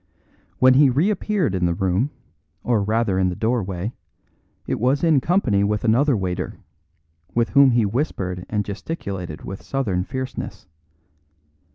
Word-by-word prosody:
When 130 0 +6
he 140 +1 +6
reappeared 180 - +1
in 90 -2 +1
the 85 - 0
room, 95 +9 0 0.5
or 120 -4 +1
rather 105 -2 +1
in 95 -1 +2
the 90 - -4
doorway, 105 -2 -2 0.7
it - - -2
was 130 +6 +1
in 160 -5 +4
company 130 - +2
with 105 +1 0
another 125 +3 +3
waiter, 90 -2 -3 0.8
with 115 0 +2
whom 140 -1 +6
he 120 -3 +3
whispered 100 - -2
and 105 -2 -1
gesticulated 100 - -6
with 95 - -7
southern 105 -10 -1
fierceness. 130 +4 -6
115 Hz, 140 wpm, -22 LUFS, 95-135 Hz, 0.8 s, When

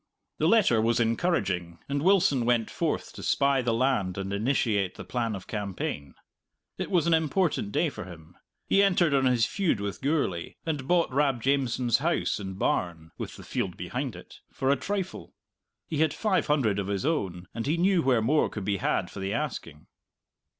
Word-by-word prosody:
The - - +3
letter 195 - +4
was 115 +2 +2
encouraging, 100 - 0
and 140 0 -1
Wilson 175 -8 +3
went 115 -2 +1
forth - - -2
to - - -9
spy 140 -1 +2
the 120 -1 0
land 115 -6 +1
and 95 0 -3
initiate 105 -3 0
the - - -8
plan 115 -3 -2
of 95 - -8
campaign. 95 -9 -4 0.6
It - - -3
was 175 -4 +2
an 170 - +3
important 160 - +1
day 165 - +2
for 130 - -8
him. 85 -2 -13 0.3
He 200 - +4
entered 180 -6 +3
on 135 -1 +3
his 120 -3 +3
feud 170 - 0
with 100 -1 -4
Gourlay, 135 - -1
and 150 -5 -3
bought 175 -5 +2
Rab 135 -3 +2
Jamieson's 130 -3 +1
house 165 -4 0
and 95 -2 -6
barn 85 -4 -1
(with - - -5
the - - -11
field - - -3
behind - - -4
it) - - -13
for 135 +1 0
a - - +4
trifle. 190 +7 -4 0.5
He 155 - -4
had 155 -1 +2
five 195 -7 +1
hundred 125 -10 +2
of 100 - -3
his 100 +2 -2
own, 95 - -1
and 115 +2 -4
he 155 +4 +1
knew 185 0 +3
where 125 -6 +2
more 150 +6 +2
could 105 -3 -6
be 100 0 0
had - - -1
for - - -8
the 95 +1 -2
asking. 100 - -5
125 Hz, 190 wpm, -27 LUFS, 100-155 Hz, 0.6 s, letter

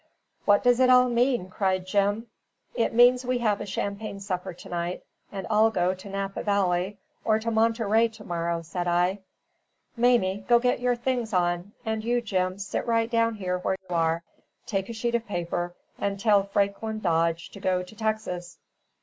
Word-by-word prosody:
"What 205 -1 +4
does 245 0 +4
it 255 0 +5
all 250 0 +6
mean?" 240 -4 +1
cried 185 -2 0
Jim. 205 +3 +1 0.5
"It 230 - +1
means 245 +2 +5
we 250 0 0
have 215 -4 0
a - - -5
champagne 200 +1 -4
supper 190 -1 -4
to 175 - -12
night, 175 +1 -3 0.3
and 195 -1 -5
all 220 +1 +4
go 180 -4 +1
to 190 +2 -11
Napa 195 0 -3
Valley 195 -1 0 0.3
or 215 -1 +3
to 230 +1 -2
Monterey 225 0 +3
to 225 -1 -13
morrow," 170 -2 -2
said 175 +2 -4
I. 180 +3 +2 0.8
"Mamie, 230 -5 +2
go 240 - +6
and 235 - +3
get 250 - +2
your 245 0 +1
things 240 -2 -2
on; 175 +2 0
and 220 -1 -2
you, 240 +2 +1
Jim, 185 -5 -1
sit 195 +3 -4 0.2
down 230 -1 +2
right 180 -1 -2
where 190 - 0
you 175 - -3
are, 165 0 +1 0.4
take 195 -1 -2
a - - -4
sheet 235 +1 -2
of 235 -1 -1
paper, 175 -2 -3 0.2
and 200 -1 -2
tell 205 -1 +4
Franklin 200 +2 -1
Dodge 165 -3 0
to 200 - -10
go 185 -1 0
to 180 +4 -13
Texas. 215 -5 -3
200 Hz, 185 wpm, -26 LUFS, 180-230 Hz, 0.8 s, all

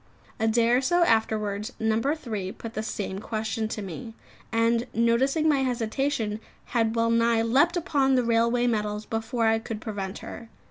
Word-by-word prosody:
A 225 - +1
day 230 +1 +3
or 245 +2 +4
so 345 +6 +3
afterwards, 220 -3 0
No. 220 0 +1
3 225 -9 -2
put 225 -1 -8
the 215 - -2
same 200 -3 -4
question 220 0 -3
to 215 -1 -5
me, 225 +5 -7 0.4
and 230 +1 +2
noticing 255 +7 +2
my 295 -3 +3
hesitation, 240 -3 -1 0.3
had 225 -2 +1
well 230 0 +2
nigh 230 0 +3
leapt 285 +10 +3
upon 280 -6 +2
the 250 - +3
railway 235 +1 +2
metals 210 -2 -1
before 225 +1 -1
I 225 0 +3
could 225 -1 -6
prevent 200 -3 -5
her. 230 -1 -9
230 Hz, 170 wpm, -26 LUFS, 220-245 Hz, 0.4 s, or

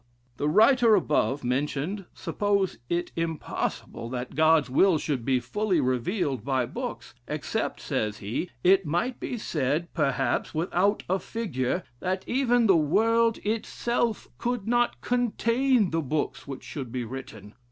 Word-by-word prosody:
The 145 - 0
writer 225 - +6
above 150 -6 +1
mentioned 145 +9 -1
supposes 200 - 0
it 175 0 -1
impossible, 165 -7 -3
that 125 0 -5
God's 155 -1 +4
will 165 +7 +4
should 145 -5 -2
be 130 +1 +2
fully 195 - 0
revealed 130 - 0
by 130 -1 +1
books; - - -6
'except,' - - -2
says 105 -1 -2
he, 105 - -3
'it 190 +2 +5
might 175 - -1
be 245 - -4
said 155 - -1
perhaps 135 -6 0
without 180 +5 +1
a 190 +2 +1
figure, 175 - -2 0.2
that 185 +1 -2
even 245 -2 +2
the 195 -4 +6
world 225 +9 +3
itself 230 +1 -1
could 245 -4 -2
not 240 +1 +1
contain 245 -1 +2
the 165 0 +1
books 150 +1 -2
which 135 -2 -7
should 130 -2 -6
be 125 0 -2
written.' 110 -4 -9
170 Hz, 140 wpm, -27 LUFS, 135-215 Hz, 0.2 s, writer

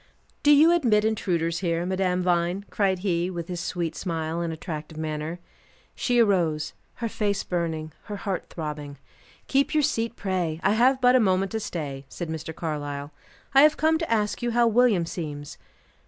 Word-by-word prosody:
"Do 290 - +3
you 300 +3 +7
admit 235 -11 +3
intruders 170 -6 0
here 170 -2 -1
Madame 185 -1 0
Vine?" 175 +2 +1
cried 195 -2 +1
he, 175 -1 +1
with 170 -2 -5
his 175 -1 -3
sweet 170 -2 -3
smile, 165 -2 -3
and 170 -1 -2
attractive 155 -1 -6
manner. 155 +1 -3 0.6
She 245 -1 0
arose; 175 -9 +2 0.2
her 235 - -3
face 205 -2 -1
burning, 160 -3 -3
her 210 - -5
heart 195 -2 -3
throbbing. 150 -3 -6 0.5
"Keep 275 +3 +1
your 305 - +4
seat, 230 -5 0
pray; 180 -6 -2
I 195 - +4
have 255 +5 +4
but 250 0 +6
a - - +6
moment 190 -3 +2
to 220 - -1
stay," 145 -9 -5
said 175 -2 -6
Mr. 160 0 -4
Carlyle. 145 -3 -4 0.4
"I 270 - +8
have 305 +1 +5
come 320 +1 +3
to 330 - -3
ask 210 -1 +1
you 240 - 0
how 235 0 +3
William 230 -6 +4
seems?" 150 -4 -6
180 Hz, 175 wpm, -26 LUFS, 160-220 Hz, 0.6 s, I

